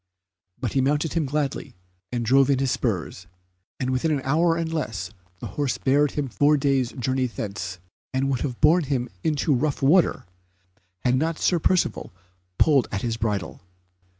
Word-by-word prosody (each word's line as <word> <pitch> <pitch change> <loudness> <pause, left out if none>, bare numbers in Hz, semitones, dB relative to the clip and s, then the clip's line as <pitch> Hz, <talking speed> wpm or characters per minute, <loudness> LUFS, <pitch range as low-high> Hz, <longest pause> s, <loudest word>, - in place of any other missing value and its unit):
But 125 -5 -3
he 135 - +2
mounted 145 +4 0
him 160 -4 0
gladly, 145 -1 -3 0.4
and 120 -1 -2
drove 135 +3 +4
in 140 - +3
his 135 -1 0
spurs, 90 - -2 0.5
and 130 0 -1
within 130 +5 0
an 145 -3 0
hour 165 +5 +2
and 165 -1 -2
less 105 - -3 0.3
the - - -5
horse 145 -3 -2
bare 145 +2 +3
him 145 -1 -3
four 145 +4 +3
days' 135 -3 +1
journey 130 +1 -1
thence, 100 -4 -5 0.3
and 130 +1 0
would 130 - -1
have 125 -5 -3
borne 160 +2 +4
him 130 -3 -1
into 150 -1 +1
a - - +2
rough 145 +1 -1
water, 165 +6 +3 0.8
had 125 - +2
not 155 +5 0
Sir 175 - +2
Percivale 180 +2 0 0.5
pulled 140 -6 +4
at 95 - -3
his 115 -2 -1
bridle. 105 -7 -3
135 Hz, 175 wpm, -24 LUFS, 125-150 Hz, 0.8 s, drove